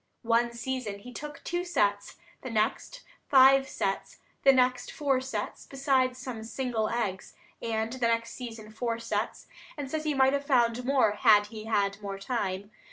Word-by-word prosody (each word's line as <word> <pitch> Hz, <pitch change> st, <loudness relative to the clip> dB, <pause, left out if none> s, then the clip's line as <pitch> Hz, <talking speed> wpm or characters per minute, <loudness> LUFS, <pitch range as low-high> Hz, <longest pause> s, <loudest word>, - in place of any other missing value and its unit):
One 235 Hz, +1 st, +2 dB
season 235 Hz, -3 st, -4 dB
he 250 Hz, +5 st, -11 dB
took 295 Hz, +3 st, -8 dB
two 350 Hz, +1 st, -2 dB
sets, 205 Hz, -, 0 dB, 0.3 s
the 255 Hz, -, -6 dB
next 230 Hz, -, -1 dB, 0.3 s
five 270 Hz, 0 st, +6 dB
sets, 195 Hz, 0 st, -3 dB, 0.2 s
the 275 Hz, -, +7 dB
next 255 Hz, -1 st, +2 dB
four 275 Hz, -3 st, 0 dB
sets, 230 Hz, -5 st, -5 dB
besides 265 Hz, -2 st, +1 dB
some 250 Hz, -3 st, -6 dB
single 230 Hz, -2 st, -2 dB
eggs, 205 Hz, -6 st, -3 dB, 0.3 s
and 225 Hz, 0 st, -2 dB
the 250 Hz, -2 st, 0 dB
next 230 Hz, 0 st, 0 dB
season 225 Hz, -4 st, -8 dB
four 230 Hz, +1 st, -2 dB
sets, 220 Hz, -1 st, -3 dB, 0.3 s
and 275 Hz, -2 st, -5 dB
says 315 Hz, -1 st, -2 dB
he 305 Hz, -2 st, 0 dB
might 265 Hz, 0 st, +4 dB
have 280 Hz, 0 st, 0 dB
found 245 Hz, -3 st, +2 dB
more 260 Hz, -5 st, +3 dB
had 210 Hz, -1 st, +5 dB
he 215 Hz, -1 st, -7 dB
had 200 Hz, -2 st, 0 dB
more 200 Hz, -1 st, -5 dB
time. 200 Hz, -2 st, -3 dB
235 Hz, 165 wpm, -29 LUFS, 215-265 Hz, 0.3 s, the